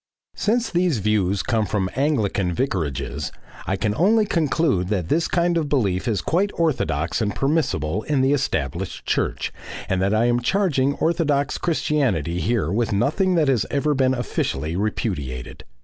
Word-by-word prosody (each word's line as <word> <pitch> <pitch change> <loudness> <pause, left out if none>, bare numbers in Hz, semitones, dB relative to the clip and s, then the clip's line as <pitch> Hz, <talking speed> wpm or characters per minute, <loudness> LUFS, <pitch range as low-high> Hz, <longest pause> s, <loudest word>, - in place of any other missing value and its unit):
Since 230 +2 0
these 175 -5 +2
views 100 -2 +1
of - - -10
God - - -3
come 110 -2 +2
from 95 -3 -1
Anglican 110 -10 +1
vicarages 75 - -2 0.4
I 95 - +1
can 105 +2 -1
only 210 - +3
conclude 155 - +1
that 95 -5 -2
this 165 +1 +2
kind 170 -1 +1
of 150 -3 -3
belief 100 -10 0
is 105 -5 0
quite 190 +5 +1
orthodox 85 - 0
and 105 -2 -1
permissible 110 - 0
in 140 +2 0
the 135 +2 +3
established 145 - -2
church, - - -1 0.3
and 95 -1 0
that 100 +3 +2
I 110 +2 +3
am 120 0 +2
charging 140 -3 +1
orthodox 150 -4 0
Christianity 125 - 0
here 105 -5 0
with 115 +2 0
nothing 180 - +1
that 160 -3 +3
has 125 -6 +2
ever 150 +1 +1
been 130 -1 +2
officially 80 - -2
repudiated. 75 - -3
120 Hz, 165 wpm, -22 LUFS, 95-150 Hz, 0.4 s, only